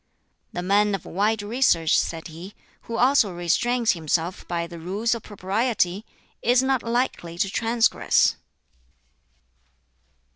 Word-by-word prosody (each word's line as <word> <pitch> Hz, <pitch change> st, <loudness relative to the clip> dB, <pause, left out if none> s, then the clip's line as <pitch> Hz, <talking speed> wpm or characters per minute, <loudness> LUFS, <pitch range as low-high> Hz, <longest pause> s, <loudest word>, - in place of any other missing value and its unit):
"The 175 Hz, -, -4 dB
man 205 Hz, +2 st, +2 dB
of 195 Hz, -, -8 dB
wide 210 Hz, +3 st, 0 dB
research," 205 Hz, -8 st, +2 dB
said 165 Hz, 0 st, -1 dB
he, 170 Hz, +5 st, -10 dB, 0.3 s
"who 230 Hz, -, -4 dB
also 250 Hz, -5 st, +4 dB
restrains 225 Hz, +8 st, +1 dB
himself 165 Hz, +1 st, -2 dB
by 170 Hz, -1 st, -2 dB
the 170 Hz, 0 st, -10 dB
Rules 200 Hz, +8 st, -1 dB
of 230 Hz, -, -4 dB
Propriety, 205 Hz, 0 st, -1 dB, 0.3 s
is 245 Hz, +2 st, +3 dB
not 265 Hz, -1 st, +1 dB
likely 230 Hz, -8 st, -2 dB
to 195 Hz, +1 st, 0 dB
transgress." 230 Hz, +1 st, +2 dB
205 Hz, 120 wpm, -24 LUFS, 175-235 Hz, 0.3 s, also